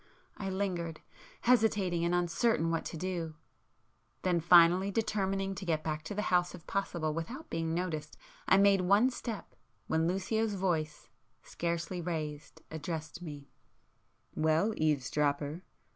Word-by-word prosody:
I 195 - -4
lingered, 180 -4 -2 0.4
hesitating 210 -8 +3
and 170 +1 +2
uncertain 175 0 +1
what 165 - -1
to 165 - -5
do,—then 170 +1 -5
finally 175 +3 +6
determining 195 -2 -1
to 190 - -7
get 160 -4 0
back 155 -1 -2
to 205 - -5
the 210 - -1
house 175 0 +2
if 165 - -14
possible 170 -6 -1
without 240 - -6
being 165 0 -1
noticed, 170 -4 -3 0.3
I - - +6
made 200 -1 +5
one 200 +8 +4
step, 230 -3 -6 0.3
when 160 +1 +1
Lucio's 210 +4 0
voice, 165 -5 -1 0.4
scarcely 170 +1 -3
raised, 160 -2 -5
addressed 160 +1 -5
me— 145 -4 -8 0.8
"Well, 160 +7 +2
eavesdropper! 150 +1 0
175 Hz, 130 wpm, -32 LUFS, 160-195 Hz, 0.8 s, finally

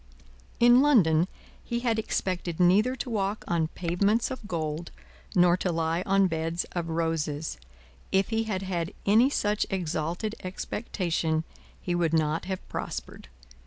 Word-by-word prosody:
In 240 +2 +7
London, 180 - +4 0.4
he 235 0 -2
had 230 -2 +1
expected 180 -5 -2
neither 205 +8 +4
to 260 - -5
walk 205 -1 -1
on 165 -2 +1
pavements 200 +8 0
of 255 -5 -6
gold, 160 -2 -3 0.5
nor 175 -1 +5
to 185 - -1
lie 165 +1 0
on 195 0 +4
beds 165 0 -1
of 170 -2 -3
roses; 160 - -2 0.5
if 195 +1 +2
he 225 0 0
had 195 -3 -2
had 175 -1 -3
any 225 +6 +5
such 210 -6 0
exalted 175 +2 -2
expectation, 175 -4 -2 0.4
he 175 - -3
would 170 -2 +1
not 155 +1 +1
have 190 0 -5
prospered. - - -6
180 Hz, 140 wpm, -27 LUFS, 165-210 Hz, 0.5 s, In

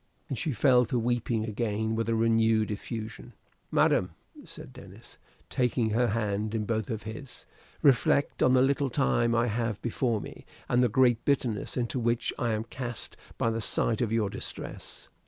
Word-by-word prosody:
And 135 - -2
she 155 - -1
fell 125 0 +4
to 125 +2 -1
weeping 120 -1 0
again 110 0 -2
with 115 0 -1
a 115 - +2
renewed 115 -1 +2
effusion. 110 +2 -6 0.4
"Madam," 90 -3 +2 0.3
said - - -11
Denis, - - -14 0.3
taking 120 -3 0
her 120 +3 +2
hand 105 0 -1
in 110 -1 -1
both 110 -1 -2
of 110 -2 -4
his; 115 +5 -9 0.4
"reflect 140 +1 +3
on 130 - +5
the 130 0 +5
little 140 +1 +1
time 120 -3 +1
I 115 +1 +3
have 115 -2 -2
before 120 -1 0
me, - - -10 0.2
and 120 0 +2
the 125 - +3
great 120 0 +3
bitterness 125 -7 -1
into 125 +1 -1
which 120 0 0
I 120 - 0
am 110 0 -1
cast 120 0 -6 0.2
by 115 - +1
the 115 0 -2
sight 110 +1 +1
of 115 -3 0
your 110 -3 +1
distress. - - -7
115 Hz, 175 wpm, -28 LUFS, 110-125 Hz, 0.4 s, on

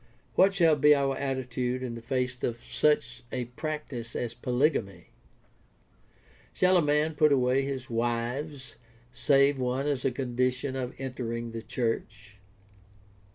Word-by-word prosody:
What 195 +1 +4
shall 165 -4 +5
be 150 +1 +6
our 135 -1 +1
attitude 130 -2 -2
in 125 -2 -4
the 115 - -7
face 125 +1 -2
of 120 - -1
such 125 -1 0
a 125 -1 -2
practice 125 -3 -5
as 120 -1 -2
polygamy? 125 - -1 1.4
Shall 185 0 +3
a - - +4
man 150 +1 +2
put 150 0 +4
away 130 0 +3
all 135 - -3
his 130 -1 -5
wives 120 +3 -3 0.4
save 140 +2 +3
one 130 +2 -1
as 145 -3 -1
a - - +3
condition 125 +1 -1
of 125 -2 -4
entering 120 -3 -4
the 115 0 -5
church? 110 -3 -4
130 Hz, 140 wpm, -28 LUFS, 120-140 Hz, 1.4 s, be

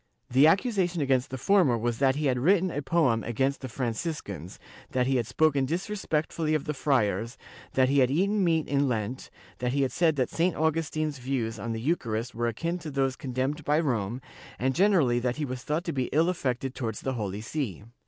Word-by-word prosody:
The 135 +4 +6
accu 190 +10 +4
sation 180 -4 0
against 130 -2 +1
the 130 - -5
former 175 -7 +3
was 115 0 -2
that 135 -1 +3
he 150 +1 -1
had 125 -3 +2
written 185 +5 +3
a 145 - -3
poem 135 -6 +2
against 135 +4 -1
the 130 - -5
Franciscans, 115 - -4 0.4
that 125 -1 +2
he 135 0 +2
had 120 -3 -1
spoken 140 +1 +2
disrespectfully 160 -3 -1
of 150 - -2
the 150 - -2
friars, 115 -5 0 0.4
that 130 -1 +4
he 140 +2 +3
had 125 -2 +4
eaten 195 +8 +1
meat 165 -3 +2
in 140 0 +2
Lent, 115 +2 -3 0.3
that 125 0 -1
he 140 0 +2
had 130 - 0
said 165 -3 +2
that 130 -3 0
St. 175 +2 +1
Augustin's 155 -2 -1
views 120 -4 -2
on 115 +3 -4
the 115 - -3
Eucharist 120 -4 -1
were 120 +1 -1
akin 165 +10 -2
to 160 -2 -7
those 135 -2 0
condemned 135 +4 -3
by 150 +2 +2
Rome, 120 -5 -1 0.4
and 130 +2 0
generally 165 -10 +3
that 120 0 -1
he 150 - -2
was 130 -1 -5
thought 150 +6 -2
to 170 -3 -3
be 130 -2 0
ill 160 +4 +3
affected 130 -6 -2
towards 115 -5 -4
the 130 - -2
Holy 105 -4 -3
See. 110 - -4
135 Hz, 210 wpm, -27 LUFS, 120-160 Hz, 0.4 s, The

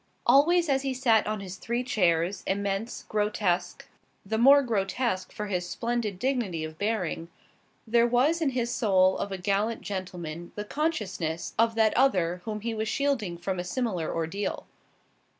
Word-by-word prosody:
Always 340 +5 +5
as 270 -2 +2
he 270 -1 -2
sat 230 -5 +3
on 215 -1 -2
his 190 -1 -7
three 235 +4 -2
chairs, 180 -5 +1
immense, 200 +3 -2
grotesque 205 -4 -1 0.4
the 220 +3 -1
more 280 +4 +7
grotesque 210 -2 -1
for 210 - -5
his 180 -3 -2
splendid 235 -5 -2
dignity 225 -9 -1
of 155 0 -7
bearing 195 -6 -2 0.6
there 235 +1 +3
was 270 +8 +2
in 305 - +2
his 240 0 0
soul 190 -5 +3
of 200 - -3
a 195 - -3
gallant 200 +5 0
gentleman 175 -4 -6
the 210 - -4
consciousness 190 - -2
of 230 0 +3
that 220 -1 +3
other, 180 -9 +2
whom 215 -1 -4
he 230 +1 -2
was 220 0 -2
shielding 235 -9 -1
from 185 +1 -3
a - - -2
similar 185 -4 -2
ordeal. 165 +5 -3
210 Hz, 160 wpm, -27 LUFS, 185-240 Hz, 0.6 s, more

